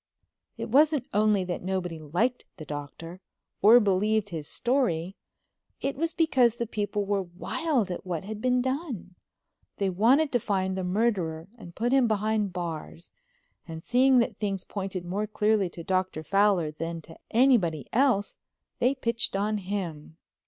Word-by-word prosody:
It - - -5
wasn't 290 +1 +4
only 210 -2 +3
that 180 -1 -4
nobody 180 -3 -3
liked 180 - -1
the 155 - -8
Doctor, 150 +5 -8 0.4
or 225 +4 +8
believed 210 0 +1
his 160 -5 -6
story, 215 -9 0 0.6
it 275 - -2
was 325 +4 -1
because 260 -9 +3
the 235 - -2
people 205 -2 -2
were 200 0 0
wild 200 - -2
at 180 - -5
what 180 -3 -4
had 215 +2 -7
been 250 0 +2
done. 260 - -4 0.6
They 195 -2 0
wanted 255 - +3
to 245 - +2
find 190 -3 -1
the 190 - -3
murderer 180 -4 -1
and 175 -8 -12
put 240 +3 0
him 265 -3 +4
behind 215 -1 0
bars 170 -1 -6 0.6
and 160 -1 -8
seeing 255 +1 +4
that 235 - +1
things 195 -3 -2
pointed 190 -3 -5
more 200 +4 -2
clearly 210 -2 +1
to 170 0 -9
Dr. 185 -3 -1
Fowler 195 -2 +2
than 165 +1 -5
to 165 +1 -14
anybody 220 - +3
else 245 -5 +2 0.4
they 255 +3 +2
pitched 235 -4 0
on 210 +2 0
him. 175 -6 -5
200 Hz, 155 wpm, -27 LUFS, 175-235 Hz, 0.6 s, or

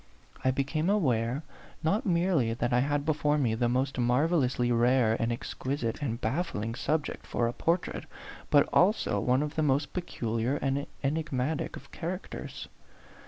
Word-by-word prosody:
I 130 - +3
became 140 +6 0
aware, 130 - +1 0.4
not 200 +8 +1
merely 170 -10 +2
that 120 +1 -1
I 125 - +4
had 145 +2 0
before 150 -1 +2
me 125 -6 +1
the 120 +1 +1
most 130 +2 0
marvellously 125 -1 +2
rare 120 -1 +3
and 115 +1 0
exquisite 120 +1 -3
and 120 -5 -2
baffling 115 - -2
subject 150 +5 -2
for 120 - 0
a 115 - +1
A - - -15
PHANTOM - - -16
LOVER. 170 - +3
31 - - -5
portrait, - - -17 0.3
but 145 -1 +5
also 205 +5 +3
one 130 +3 +2
of 150 0 -4
the 160 - 0
most 145 0 +1
peculiar 120 -8 -1
and 140 0 -1 0.2
enigmatic 145 0 -1
of 140 - -12
characters. 180 +3 -6
135 Hz, 165 wpm, -29 LUFS, 120-155 Hz, 0.4 s, but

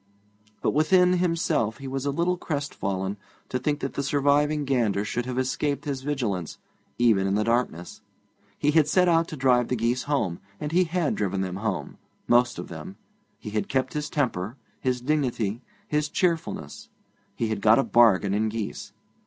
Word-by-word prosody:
But - - +2
within 180 +4 +4
himself 165 -10 0
he 135 - -8
was 135 +1 -3
a - - +2
little 170 +5 +1
crest 145 -5 -4
fallen 95 0 -2 0.3
to 125 - -1
think 145 +3 -1
that 135 - -3
the - - -2
surviving 145 +2 +2
gander 115 -7 +1
should 120 +4 -3
have 125 -1 -3
escaped 140 +4 -1
his 140 -3 -3
vigilance, 115 - -2 0.4
even 110 -5 +3
in 95 - +1
the 105 - +2
darkness. 115 -7 -1 0.6
He 150 - +2
had 155 -1 +4
set 180 +4 +3
out 165 -1 +3
to 155 - -7
drive 125 -2 +3
the 125 - 0
geese 120 +2 0
home, 105 - 0 0.2
and 150 - -4
he 180 +2 +3
had 170 -2 0
driven 100 -2 -1
them 95 -1 -3
home, 110 +2 -3 0.3
most 120 0 +3
of - - -6
them. 190 +1 -8 0.4
He 105 - -8
had 105 0 -2
kept 130 -1 0
his 150 0 -3
temper, 120 -5 -1 0.2
his 125 -1 -1
dignity, 125 -6 -1 0.3
his 150 0 0
cheerfulness. 160 - -2 0.5
He 115 - -1
had 110 -2 -2
got 110 +1 +6
a 135 - +3
bargain 105 -6 +4
in 110 +2 +1
geese. 110 -1 -5
130 Hz, 180 wpm, -26 LUFS, 110-150 Hz, 0.6 s, got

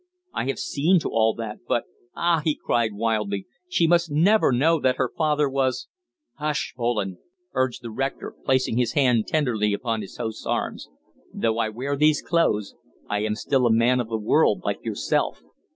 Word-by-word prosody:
I - - -2
have 135 - -1
seen 165 +7 +2
to - - -2
all 110 0 +2
that, 110 -2 -6
but 120 - +1 0.3
ah!" 170 -2 +2
he 155 -2 +1
cried 115 -3 0
wildly, 105 -3 -1 0.2
"she 170 - +2
must 170 0 +3
never 175 +6 +4
know 155 +7 +3
that 130 -2 +2
her - - -1
father 150 -2 +2
was 130 -2 -1 0.2
" 310 -3 -58
"Hush, 150 0 -2
Poland!" 115 -6 -1 0.4
urged 130 -1 -1
the 115 - -6
rector, 135 +5 -3
placing 130 -3 +1
his 125 -2 +1
hand 125 -7 +3
tenderly 115 -9 +1
upon 115 +1 -2
his 100 - -10
host's 110 -1 -5
arm. - - -1 0.5
"Though 115 0 -1
I 110 -1 +1
wear 130 +6 -3
these 150 +1 +3
clothes, 150 - +1 0.3
I 105 - -1
am 105 0 -1
still 130 +2 +1
a - - +3
man 120 +3 +3
of 120 -2 -3
the 115 - -1
world 105 - +2
like - - -2
yourself. - - -1
125 Hz, 185 wpm, -24 LUFS, 110-150 Hz, 0.5 s, never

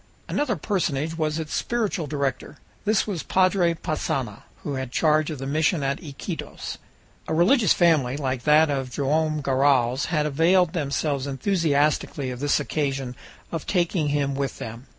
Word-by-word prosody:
another 285 -6 0
personage 160 -4 -1
was 155 -1 -1
its 160 -2 -5
spiritual 210 -9 -1
director; 140 -3 -3 0.3
this 215 -1 +2
was 190 -7 -3
Padre 185 -2 +2
Passanha, 140 -8 -3 0.2
who 145 - -3
had 130 -2 -4
charge 155 +2 +2
of 155 - -4
the 135 - -6
mission 155 +2 +1
at 135 0 -1
Iquitos. 145 -4 -6 0.5
A 160 - -1
religious 205 - +4
family, 150 -7 +3
like 130 -3 -2
that 150 +2 +4
of 135 -2 -2
Joam 155 +4 0
Garral's, 135 -1 +2
had 155 -3 0
availed 165 +4 +3
themselves 145 -3 -1
enthusiastically 145 -3 0
of 125 - -6
this 145 +1 +2
occasion 135 -4 -2 0.4
of 165 -3 -4
taking 175 -4 +1
him 145 -1 0
with 135 -1 -3
them. 115 +3 -8
150 Hz, 150 wpm, -24 LUFS, 135-165 Hz, 0.5 s, religious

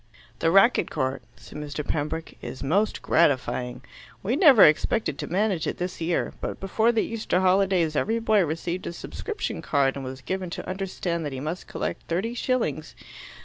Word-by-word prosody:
"The 165 - +2
racquet 195 +8 +5
court," 130 -2 -2
said 150 - -11
Mr. 150 0 -5
Pembroke, 160 +2 -3
"is 130 - -7
most 195 +10 +1
gratifying. 125 -5 +1 0.4
We 220 +7 0
never 285 - +8
expected 150 +1 +3
to - - -4
manage 190 -3 0
it - - -2
this 180 -1 -4
year. 165 +1 0
But - - -4
before 220 +4 +2
the 225 -2 +1
Easter 220 -5 -1
holidays 185 -4 +2
every 225 +9 +1
boy 220 -3 +3
received 170 +3 -3
a - - -4
subscription 435 - -5
card, 140 -2 +1
and 140 - -5
was 130 0 -7
given 185 +4 -3
to - - -7
understand 185 -3 -3
that 145 -2 -4
he 130 - -4
must 155 +6 -5
collect - - -4
thirty 190 +8 -1
shillings. 225 - -1
175 Hz, 175 wpm, -25 LUFS, 150-200 Hz, 0.4 s, never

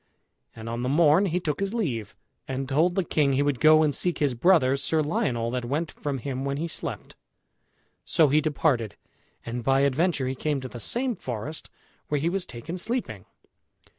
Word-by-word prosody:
And 110 0 -9
on 115 +1 -3
the 125 - -1
morn 160 +5 +4
he 180 +1 0
took 160 -2 -3
his 200 +3 -2
leave, 120 - -2 0.3
and 135 0 -3
told 160 +6 +2
the 190 - +1
king 145 -4 +1
he 135 +2 +2
would 145 -4 0
go 155 +3 +6
and 150 -2 +2
seek 175 +3 0
his 145 -5 +1
brother, 135 -1 +4
Sir 155 +3 +1
Lionel, 120 -6 -1
that 125 -1 -2
went 150 +7 -2
from 145 -2 -4
him 130 +1 -4
when 140 0 -2
he 165 +3 -2
slept. 165 - -5 0.9
So 160 - +3
he 150 +3 +4
departed, 135 -8 0 0.5
and 120 +1 -4
by 135 +2 +3
adventure 140 0 +1
he 130 - -1
came 145 +2 -1
to 130 - -5
the 120 - -9
same 245 - -1
forest 130 - -6 0.4
where 150 - 0
he 160 +4 0
was 190 0 -3
taken 165 +10 -7
sleeping. 240 +6 -3
145 Hz, 195 wpm, -26 LUFS, 130-165 Hz, 0.9 s, go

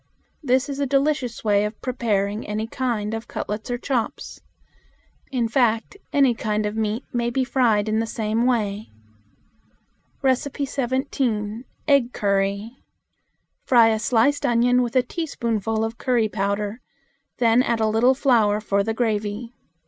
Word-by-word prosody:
This 260 -2 +2
is 280 -1 -5
a 280 - 0
delicious 275 -3 0
way 205 -2 +3
of 210 +1 -4
preparing 215 -4 -1
any 210 +1 -2
kind 225 -3 -2
of 225 +1 -5
cutlets 210 +2 -5
or 245 - -1
chops. 245 -2 -3 0.9
In 245 -4 0
fact, 230 - +1 0.2
any 275 -4 +4
kind 215 -2 -1
of 210 +1 -3
meat 220 +2 -2
may 240 -1 0
be 260 +2 0
fried 230 -5 +2
in 215 0 +1
the 225 - -1
same 225 +2 0
way. 215 -4 -1 1.4
17. 260 -4 -2 0.2
Egg 275 -4 +3
Curry. 200 +4 -1 0.8
Fry 235 -3 +5
a 220 -1 +1
sliced 245 +5 +2
onion 245 +1 +3
with 240 0 -3
a 255 - +4
teaspoonful 230 - -2
of 225 +1 -6
curry 240 -4 +2
powder; 200 +3 -2 0.6
then 235 0 +4
add 235 -2 0
a 220 - +2
little 225 +4 +3
flour 225 -7 +3
for 200 -2 0
the 220 +1 -2
gravy. 220 0 -2
230 Hz, 140 wpm, -23 LUFS, 215-255 Hz, 1.4 s, Fry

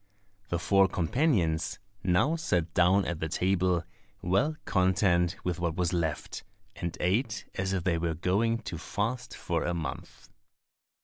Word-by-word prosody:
The 85 - 0
four 95 +3 +4
companions 90 - +1 0.3
now 95 - +3
sat 90 - -1
down 90 +3 +4
at 85 -2 -3
the 80 - -2
table, 90 0 +1 0.4
well 110 - +2
content 90 -2 +2
with 90 -1 -2
what 85 -2 -1
was 90 0 0
left, 80 -4 -2 0.3
and 85 +1 -4
ate 105 +3 0
as 95 0 -2
if 95 -3 -1
they 85 -2 +1
were 85 -1 -1
going 110 +7 +1
to 85 - -5
fast 120 +7 -3
for 85 -2 -1
a 85 - -1
month. 80 -2 -6
90 Hz, 145 wpm, -29 LUFS, 85-100 Hz, 0.4 s, four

